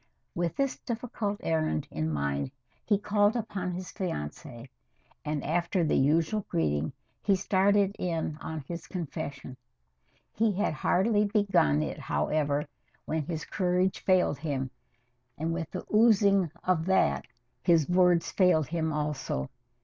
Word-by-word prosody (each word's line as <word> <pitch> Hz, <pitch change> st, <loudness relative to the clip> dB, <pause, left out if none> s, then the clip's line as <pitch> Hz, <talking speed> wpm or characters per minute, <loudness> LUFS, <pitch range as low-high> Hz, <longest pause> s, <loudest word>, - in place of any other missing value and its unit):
With 170 Hz, -1 st, -1 dB
this 275 Hz, -1 st, -1 dB
difficult 225 Hz, -4 st, -3 dB
errand 155 Hz, -, 0 dB
in 80 Hz, +1 st, -2 dB
mind, 70 Hz, -, -1 dB, 0.3 s
he 205 Hz, -, +2 dB
called 205 Hz, +1 st, +2 dB
upon 200 Hz, -6 st, -3 dB
his 180 Hz, +1 st, -6 dB
fiancée, 120 Hz, -, -5 dB, 0.6 s
and, 150 Hz, -2 st, -2 dB
after 175 Hz, +3 st, 0 dB
the 155 Hz, -, +1 dB
usual 160 Hz, +9 st, +2 dB
greeting, 75 Hz, -2 st, 0 dB, 0.3 s
he 200 Hz, -, +3 dB
started 200 Hz, +1 st, +2 dB
in 165 Hz, -3 st, -2 dB
on 160 Hz, -1 st, -5 dB
his 165 Hz, +3 st, -7 dB
confession. 145 Hz, -6 st, -5 dB, 0.8 s
He 220 Hz, -1 st, +2 dB
had 195 Hz, -3 st, 0 dB
hardly 205 Hz, +7 st, +2 dB
begun 200 Hz, -, +2 dB
it, -, -, -4 dB
however, 150 Hz, -1 st, 0 dB, 0.4 s
when 160 Hz, 0 st, -1 dB
his 160 Hz, -3 st, -4 dB
courage 180 Hz, 0 st, 0 dB
failed 185 Hz, -6 st, +2 dB
him, 135 Hz, -4 st, -2 dB, 0.7 s
and 160 Hz, +2 st, -1 dB
with 165 Hz, -2 st, -3 dB
the 185 Hz, -, -6 dB
oozing 200 Hz, -5 st, +5 dB
of 180 Hz, -3 st, +1 dB
that 70 Hz, -, +2 dB, 0.3 s
his 165 Hz, -4 st, +4 dB
words 180 Hz, -1 st, +3 dB
failed 180 Hz, -5 st, +4 dB
him 160 Hz, -1 st, -1 dB
also. 150 Hz, -, -2 dB
170 Hz, 135 wpm, -29 LUFS, 150-195 Hz, 0.8 s, oozing